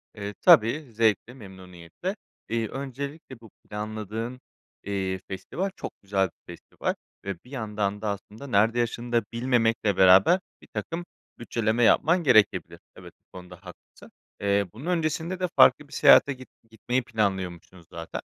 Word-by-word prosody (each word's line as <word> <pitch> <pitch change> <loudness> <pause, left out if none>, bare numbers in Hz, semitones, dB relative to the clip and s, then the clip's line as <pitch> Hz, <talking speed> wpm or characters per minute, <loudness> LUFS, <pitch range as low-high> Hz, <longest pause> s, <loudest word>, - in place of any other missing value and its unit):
Eee, 100 -1 -6
tabii, 120 +8 +5
zevkle, 110 +1 +1
memnuniyetle. 95 - -8 0.3
Eee, 115 -1 -1
öncelikle 140 0 -7
bu 115 - -15
planladığın, 110 +4 -6 0.4
eee, 95 -1 -2
festival 160 - -4
çok - - -6
güzel 95 -2 0
bir - - -40
festival - - -4 0.3
ve 100 -2 -3
bir 125 - -18
yandan 105 -4 -3
da 105 - -2
aslında, 105 +6 -7
nerede 115 +1 +2
yaşadığını 120 0 -1
bilmemekle 115 -4 +1
beraber, 95 - +6 0.2
birtakım 170 +1 -6 0.3
bütçeleme 115 0 0
yapman 165 +9 +4
gerekebilir. 110 -7 +3 0.2
Evet, - - -13
bu - - -13
konuda 90 0 -11
haklısın. 90 0 -15 0.3
Eee, 100 0 +2
bunun 130 +8 -10
öncesinde 170 +1 -1
de 180 - 0
farklı - - +6
bir - - -16
seyahate 140 - +6
git 130 0 -13 0.2
gitmeyi 120 +3 -2
planlıyormuşsunuz 95 -6 -3
zaten. 85 0 -6
110 Hz, 135 wpm, -26 LUFS, 100-130 Hz, 0.4 s, beraber